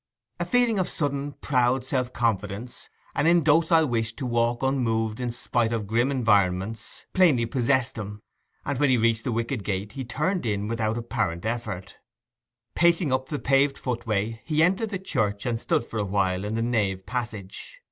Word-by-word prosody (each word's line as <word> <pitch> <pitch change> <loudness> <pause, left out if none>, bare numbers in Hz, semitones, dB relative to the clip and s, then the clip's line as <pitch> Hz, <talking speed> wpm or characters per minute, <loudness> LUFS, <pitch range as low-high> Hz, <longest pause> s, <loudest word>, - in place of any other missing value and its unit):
A - - 0
feeling 245 -4 +2
of 185 - 0
sudden, 145 -1 -2
proud 125 -1 +2
self 130 -2 -1
confidence, 110 0 -2 0.2
an 145 - +1
indocile 165 0 +4
wish 115 -2 -1
to 135 - -5
walk 120 0 0
unmoved 115 -4 0
in 125 -1 -2
spite 120 -1 0
of 115 -3 -1
grim 115 +5 +1
environments, 105 -4 0
plainly 160 -11 +4
possessed 125 0 +1
him, 105 0 -7 0.4
and 140 -3 -2
when 145 -1 +3
he 130 - +4
reached 115 0 +1
the 125 - 0
wicket 115 +1 -2
gate 100 +1 -3
he 135 +4 -5
turned 155 +10 -1
in 105 -2 -1
without 115 0 -1
apparent 110 -7 -2
effort. 110 -5 -4 0.8
Pacing 170 -4 +3
up 130 0 -1
the 150 - -2
paved 135 0 +2
footway 115 -3 -2
he 155 0 +2
entered 195 +6 +2
the 200 - -2
church 110 - -1
and 120 -2 -1
stood - - 0
for 115 - -5
a - - +1
while 95 -1 0
in 105 +2 -2
the 115 - 0
nave 100 -6 0
passage. 115 - -5
120 Hz, 175 wpm, -26 LUFS, 110-140 Hz, 0.8 s, indocile